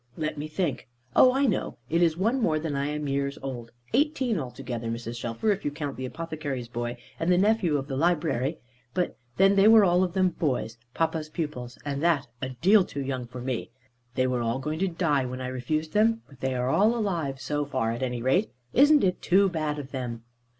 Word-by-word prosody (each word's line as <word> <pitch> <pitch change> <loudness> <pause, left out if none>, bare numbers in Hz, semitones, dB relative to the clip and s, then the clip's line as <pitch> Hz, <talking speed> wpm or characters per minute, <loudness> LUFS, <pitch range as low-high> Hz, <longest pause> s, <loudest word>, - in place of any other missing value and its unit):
"Let 155 -1 -2
me 150 +1 -5
think! 155 -6 -2 0.3
Oh 255 - +7
I 270 +2 +2
know! - - -1
it's 165 +1 +2
one 230 +8 +1
more 160 -8 +2
than 155 -2 -3
I 140 +1 0
am 150 0 -3
years 140 0 -1
old. 120 -4 -5 0.2
Eighteen 265 - +2
altogether, 125 -3 -5
Mrs. 115 +1 -4
Shelfer; 120 - 0
if 200 - -2
you - - 0
count 145 -2 -5
the 130 0 -4
apothecary's 150 -5 -5
boy, 120 0 -4 0.2
and 165 +2 +1
the 180 - +5
nephew 195 -6 +3
of 135 0 -4
the 135 - -3
library; 155 -2 +1 0.4
but 180 -1 0 0.2
then 195 +1 +5
they 200 +1 +6
were 220 -1 +8
all 180 -1 +4
of 180 -2 -2
them 185 -1 +3
boys, 125 -9 -2 0.2
papa's 160 -1 -1
pupils 135 -7 -5
and 140 -1 -2
that, 165 -4 +2 0.2
a 130 - -2
deal 185 - +4
too 140 -5 -5
young 130 -2 -3
for 125 +1 -8
me. 125 -1 -3 0.5
They 130 - +2
were 125 -1 0
all 115 +1 0
going 150 +4 -3
to 195 - +2
die, 165 -6 +1
when 130 +1 -5
I 130 0 -3
refused 155 +5 -2
them; 225 +2 +3
but 140 -3 -18
they 130 -1 -1
are 125 +1 0
all 215 +8 +4
alive 170 - -2
so 145 +2 -1
far, 130 -5 -1
at 115 - -4
any 125 -2 -2
rate. 180 - +2 0.2
Isn't 290 +3 +6
it 185 -1 +1
too 195 +2 +4
bad 155 -4 -2
of 140 -2 -7
them?" 120 -4 -5
150 Hz, 215 wpm, -27 LUFS, 130-180 Hz, 0.5 s, were